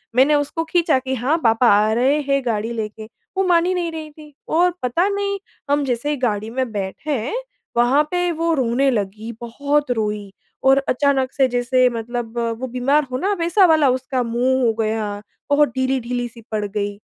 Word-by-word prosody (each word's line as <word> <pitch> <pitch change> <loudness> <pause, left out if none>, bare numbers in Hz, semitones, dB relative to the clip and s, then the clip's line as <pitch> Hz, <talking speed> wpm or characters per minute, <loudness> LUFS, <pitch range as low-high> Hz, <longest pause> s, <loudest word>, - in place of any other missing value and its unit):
मैंने 270 +4 +5
उसको 290 +3 -1
खींचा 335 -5 +3
कि 260 0 -4
हाँ 260 +7 +1
पापा 225 +1 +4
आ 210 +1 +3
रहे 260 +6 +2
हैं 275 -1 0
गाड़ी 225 -1 -1
लेके, 215 -1 -5 0.3
वो 385 - +3
मान 340 -1 +4
ही 365 - +1
नहीं 350 -2 -2
रही 315 -1 -7
थी। 300 0 -15
और 350 +2 +3
पता 290 +10 +1
नहीं 400 0 -1 0.3
हम 290 0 +2
जैसे 250 +2 -1
ही 295 - -1
गाड़ी 215 -4 -1
में 255 0 -2
बैठे, 220 - -3 0.4
वहाँ 250 +5 +4
पे 355 -1 +1
वो 330 0 0
रोने 265 -1 +2
लगी, 215 0 -3
बहुत 280 +4 -1
रोई 210 -3 -2 0.3
और 270 0 +5
अचानक 265 0 +1
से 270 -2 +3
जैसे 250 +1 +2
मतलब 235 0 -5 0.2
वो 260 - -3
बीमार 255 +5 +1
हो 255 - -1
ना 385 +9 0
वैसा 345 +4 +4
वाला 315 -5 +4
उसका 255 +1 -1
मुँह 245 +3 +1
हो 225 - +3
गया, 215 -2 -1 0.3
बहुत 290 0 +4
ढीली-ढीली 250 -2 -1
सी 235 0 -14
पड़ 215 -1 -1
गई। 205 0 -3
255 Hz, 185 wpm, -20 LUFS, 230-295 Hz, 0.4 s, मैंने